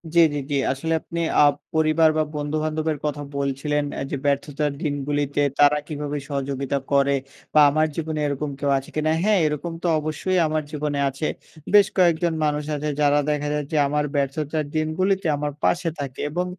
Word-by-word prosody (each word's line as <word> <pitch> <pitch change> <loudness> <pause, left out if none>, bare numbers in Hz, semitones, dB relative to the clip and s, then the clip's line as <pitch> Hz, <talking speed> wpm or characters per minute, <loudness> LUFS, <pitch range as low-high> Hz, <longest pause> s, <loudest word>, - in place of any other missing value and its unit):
জি, - - +6
জি, 145 - -2
জি 145 - +1 0.2
আসলে 160 +5 -2
আপনি 170 - -6 0.2
আব 145 - +5 0.2
পরিবার 160 0 +4
বা 155 - +3
বন্ধুবান্ধবের 155 +1 -1
কথা 145 0 -2 0.2
বলছিলেন 140 +2 -1 0.2
এ - - -3
যে, 140 - -1
"ব্যর্থতার 145 +1 0
দিনগুলিতে 145 -1 -1 0.2
তারা 145 0 +6
কীভাবে 150 -1 -4
সহযোগিতা 140 -1 -2
করে 140 0 +3 0.4
বা 155 - +6
আমার 155 +2 +2
জীবনে 160 -1 -3
এরকম 145 +1 -2
কেউ 145 - 0
আছে 135 - -6
কিনা?" 155 0 +1
হ্যাঁ 210 -2 +4
এরকম 155 +3 -2
তো 175 - +1
অবশ্যই 155 +5 -1
আমার 155 0 -1
জীবনে 150 -1 -2
আছে। 135 +3 -3 0.5
বেশ 205 -1 +7
কয়েকজন 170 -2 +3
মানুষ 150 0 0
আছে 150 +1 -2
যারা 145 0 +4
দেখা 150 0 -1
যায় 150 -1 -2
যে 155 - 0
আমার 150 +1 0
ব্যর্থতার 145 +2 -1
দিনগুলিতে 185 +5 0
আমার 145 0 -2
পাশে 170 -1 +2
থাকে। 135 -2 -5
এবং 180 +3 -1
150 Hz, 175 wpm, -23 LUFS, 145-155 Hz, 0.5 s, বেশ